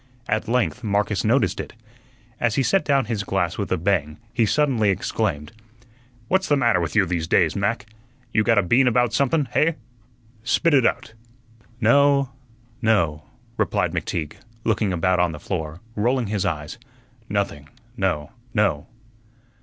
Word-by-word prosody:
At 110 +2 -1
length 125 +1 0
Marcus 105 -1 0
noticed 120 +5 +2
it. - - -6 0.7
As 115 -3 +1
he 135 - +2
set 195 +7 +2
down 140 -3 +2
his 110 -3 -2
glass 90 -3 -1
with 100 - -3
a 95 - +2
bang 80 -4 0 0.2
he 115 -3 +2
suddenly 130 -6 +2
exclaimed: 75 -5 -1 0.8
"What's 190 0 +1
the 145 - +3
matter 120 -8 +3
with 80 -1 -3
you 105 -2 +4
these 85 -2 -2
days, 85 -2 +2
Mac? 100 +3 -1 0.5
You 110 - +3
got 115 0 +3
a 105 - +4
bean 125 +9 +3
about 125 -1 +2
somethun, 140 +1 +1
hey? 160 +4 +2 0.7
Spit 155 +7 +2
ut 130 -4 +5
out." - - -3 0.7
"No, 140 +3 +4 0.5
no," 85 -10 +1 0.3
replied - - 0
McTeague, 80 -3 -3 0.3
looking 110 -3 +1
about 90 +1 +1
on 90 -2 +1
the 75 - -8
floor, 80 -1 -5
rolling 120 +4 +1
his 100 -2 -1
eyes; 75 +8 -4 0.5
"nothing, 95 -8 -2 0.3
no, 90 -9 -1 0.2
no." 100 -9 +1
105 Hz, 155 wpm, -23 LUFS, 90-125 Hz, 0.8 s, ut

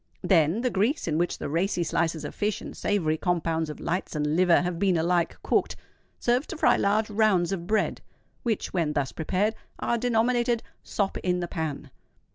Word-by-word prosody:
Then 170 +3 +3
the 250 -1 0
grease, 215 - 0
in 155 0 0
which 175 - 0
the - - -4
racy 175 +4 0
slices 165 -1 -1
of - - -6
fish 210 -1 -1
and - - -9
savoury 160 -6 0
compounds 165 -2 0
of 150 - -7
lights 180 -1 -3
and 150 0 0
liver 180 0 +4
have 175 -1 -2
been 190 -3 +3
alike 170 +1 +1
cooked, - - +1 0.4
serves 245 +4 +1
to - - -6
fry - - +4
large 210 +2 +1
rounds 205 -4 +3
of 175 -3 -3
bread, 215 +1 0 0.4
which, 225 -4 -2
when 165 -5 0
thus 140 -3 -1
prepared, 190 +7 0 0.2
are 235 - 0
denominated 240 0 +1 0.2
"sop 200 -2 -2
in 180 -1 0
the 175 - -2
pan." 150 -4 -4
180 Hz, 185 wpm, -26 LUFS, 165-215 Hz, 0.4 s, liver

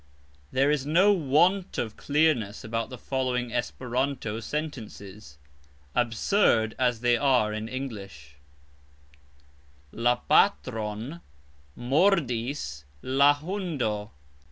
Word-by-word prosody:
There 135 +3 +3
is 150 -3 0
no 180 +8 +4
want 175 +4 +2
of 110 -3 -3
clearness 145 -9 +1
about 115 +1 -3
the 125 - -8
following 125 -2 -2
(Esperanto) 125 -3 -2
sentences, 110 - -7 0.6
absurd 115 - +2
as 120 -3 +1
they 120 -1 +3
are 125 -6 +2
in 110 +1 -4
English: 100 - -7 1.5
La 120 +2 +2
patron 115 +5 0 0.5
mordis 125 - 0 0.2
la 140 +2 +4
hundo. 145 - -3
125 Hz, 90 wpm, -27 LUFS, 110-145 Hz, 1.5 s, no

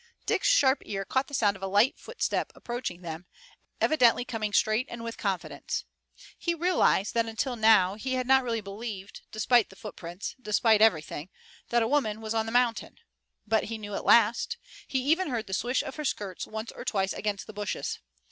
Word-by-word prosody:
Dick's - - +1
sharp 280 - +4
ear 195 -1 -4
caught 260 +5 0
the 285 - -15
sound 205 -5 +2
of 195 - -13
a 195 - -2
light 205 +6 +3
footstep 480 - -2
approaching 235 -7 -5
them, 165 +1 -7 0.5
evidently 245 -5 +4
coming 215 -4 -3
straight 215 +5 +2
and 235 -1 -7
with 230 0 -5
confidence. 175 -8 -3 0.5
He 340 -1 0
realized 335 - +2
that 230 -1 +1
until 245 +3 -2
now 215 -5 +5
he 260 +5 -3
had 255 0 -1
not 265 +1 +5
really 230 -2 -1
believed, 200 -1 -7
despite 220 +1 +3
the 190 - -15
footprints, 190 -4 -7
despite 215 -1 +3
everything, 160 -5 +2 0.4
that 240 -1 +3
a - - 0
woman 225 -6 +1
was 220 0 -4
on 225 0 0
the - - -3
mountain. 245 -1 +1 0.5
But 220 -1 +1
he 225 0 -4
knew 205 -1 -7
at - - -3
last. 235 - +4 0.3
He 265 -1 -1
even 320 +5 +2
heard 235 -4 -2
the 190 - -7
swish 245 +6 0
of - - -7
her 305 - -4
skirts 200 -8 -3
once 220 +1 -5
or - - -9
twice 195 -2 0
against 205 -2 -3
the 215 - -10
bushes. 205 -1 -3
220 Hz, 195 wpm, -28 LUFS, 200-250 Hz, 0.5 s, now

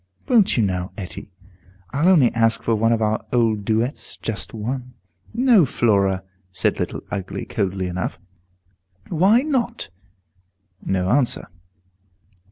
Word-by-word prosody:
"Won't 225 - +4
you 115 - +3
now, 90 -2 -2
Etty? 95 0 -7 0.6
I'll 150 +5 +1
only 155 -10 +5
ask 115 0 +2
for 115 - +1
one 115 +1 +2
of 115 -1 +1
our 110 0 0
old 110 -4 +2
duets, 115 +6 -1
just 110 -3 -5
one." 125 +3 -5 0.4
"No, 235 -5 +5
Flora," 100 -7 +1 0.3
said 95 - 0
Little - - -3
Ugly, 100 -3 -4
coldly 95 -1 -2
enough. 90 +1 -3 0.9
"Why 195 +9 +4
not?" 245 - -2 0.9
No 95 -1 0
answer. 125 +4 +1
115 Hz, 125 wpm, -22 LUFS, 100-150 Hz, 0.9 s, only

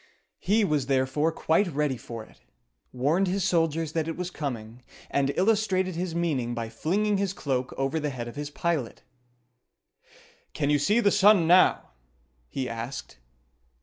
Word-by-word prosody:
He 210 +3 +2
was 150 -7 0
therefore 135 +4 +1
quite 165 +4 +1
ready 150 -4 -1
for 115 -2 -8
it, - - -22 0.5
warned 150 +10 +1
his 190 +1 0
soldiers 165 -3 +1
that 160 -1 -1
it 165 - -4
was 180 0 -4
coming, 120 -7 -5 0.3
and 140 0 +1
illustrated 190 -2 +1
his 175 -1 -3
meaning 135 -9 -1
by 115 -1 -4
flinging 200 - 0
his 195 -1 -1
cloak 130 -7 -2
over 135 +4 0
the 150 -1 -2
head 120 -3 -5
of 120 - -9
his 145 0 -5
pilot. 150 -5 -2 1.5
"Can 145 -1 0
you 145 - +3
see 210 +11 +3
the 200 - +3
sun 205 -3 +5
now?" 175 - +4 0.6
he 130 - -3
asked. 115 - -6
155 Hz, 155 wpm, -27 LUFS, 130-185 Hz, 1.5 s, sun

